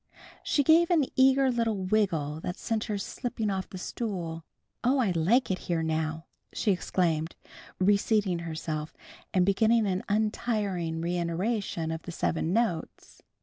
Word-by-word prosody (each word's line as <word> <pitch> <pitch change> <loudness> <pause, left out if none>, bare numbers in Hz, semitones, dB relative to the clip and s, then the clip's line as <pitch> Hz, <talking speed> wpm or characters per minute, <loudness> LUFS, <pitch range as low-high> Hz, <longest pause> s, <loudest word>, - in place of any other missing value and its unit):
She 285 - +1
gave 325 +4 +5
an 325 -6 +4
eager 265 0 +5
little 230 -3 0
wiggle 185 -7 0
that 180 +3 -4
sent 225 -1 -2
her 210 -2 -2
slipping 215 +1 -3
off 190 -1 -3
the 185 - -7
stool. 180 -5 -4 0.4
"Oh, 255 +3 +3
I 230 -8 +2
like 190 +9 +2
it 185 - -1
here, 165 -2 +1
now," 160 0 -2 0.3
she 210 - +1
exclaimed, 165 -3 0 0.4
reseating 200 -1 +2
herself 160 -2 -4 0.4
and 180 -1 +3
beginning 220 +3 +3
an 190 -1 0
untiring 205 -6 -1
reiteration 175 +1 -1
of 160 0 -4
the 175 - -7
seven 165 0 -1
notes. 190 -7 -2
190 Hz, 145 wpm, -28 LUFS, 165-225 Hz, 0.4 s, gave